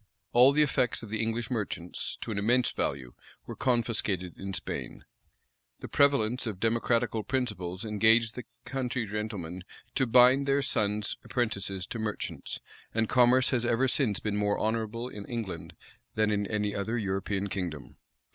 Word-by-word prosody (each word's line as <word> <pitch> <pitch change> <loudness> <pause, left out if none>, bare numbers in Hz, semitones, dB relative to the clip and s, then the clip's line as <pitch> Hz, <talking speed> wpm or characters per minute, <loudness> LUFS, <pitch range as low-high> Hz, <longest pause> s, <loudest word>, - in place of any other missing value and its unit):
All 125 +3 +8
the 150 +2 +5
effects 125 -5 0
of 110 - -8
the 110 +1 -1
English 115 +2 -2
merchants, 100 -7 -3
to - - -4
an 100 - -1
immense 120 +4 +2
value, 65 -3 -3 0.3
were - - -7
confiscated 110 -8 0
in 95 0 -6
Spain. 95 - -5 0.7
The - - -7
prevalence 130 -4 +2
of 100 -4 -4
democratical 115 0 +1
principles 105 -7 -2
engaged 110 +1 +3
the 125 - -7 0.2
country 125 -3 -2
gentlemen 100 -4 -4 0.3
to 130 -1 +1
bind 125 +3 +6
their 140 0 +2
sons 105 -3 -1
apprentices 100 -6 -2
to 115 - -6
merchants;[] 110 -1 -4 0.4
and 115 -1 +2
commerce 125 +2 +4
has 125 -3 +1
ever 120 +2 +2
since 120 -7 +1
been 105 -1 -2
more 105 0 +1
honorable 115 +2 -1
in 105 -5 -8
England 100 -9 -5 0.4
than 110 0 +2
in 100 -1 0
any 105 -1 -1
other 110 +4 -2
European 95 -1 -1
kingdom. 85 -7 -5
110 Hz, 155 wpm, -29 LUFS, 100-120 Hz, 0.7 s, All